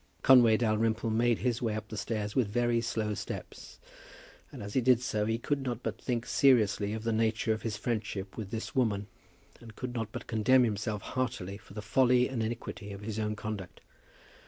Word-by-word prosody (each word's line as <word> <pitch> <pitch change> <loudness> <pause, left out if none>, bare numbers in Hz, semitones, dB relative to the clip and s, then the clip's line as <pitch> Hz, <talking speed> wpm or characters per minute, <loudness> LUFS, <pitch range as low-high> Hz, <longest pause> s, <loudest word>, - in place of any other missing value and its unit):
Conway 120 -4 +7
Dalrymple 110 0 +1
made 115 +1 +2
his 120 -2 -1
way 110 -3 0
up 110 +1 -6
the 110 - -6
stairs 105 0 -3
with 125 -5 +3
very 120 +2 +1
slow 110 -2 -1
steps, - - -7 0.7
and - - -8
as 100 0 -7
he 130 - +3
did 125 -1 +5
so 105 -4 -1
he 115 0 +1
could 140 +4 -1
not 125 -2 -4
but - - -4
think 120 -2 -2
seriously 105 -6 +3
of 110 0 -4
the 115 0 0
nature 110 0 +1
of 110 - -5
his 110 -2 -3
friendship 105 -4 -3
with 110 -4 -5
this 110 +1 -5
woman, 105 -6 +1 0.5
and 115 -2 -13
could 125 -1 -5
not 115 -3 -3
but - - -6
condemn 125 +3 +4
himself 105 -2 -2
heartily 120 -7 -3
for 100 - -16
the 105 - -5
folly 125 +2 +4
and 130 -4 -3
iniquity 110 -2 -4
of 100 0 -8
his 110 +1 -4
own 105 0 -1
conduct. 105 -4 -6
110 Hz, 200 wpm, -30 LUFS, 105-120 Hz, 0.7 s, Conway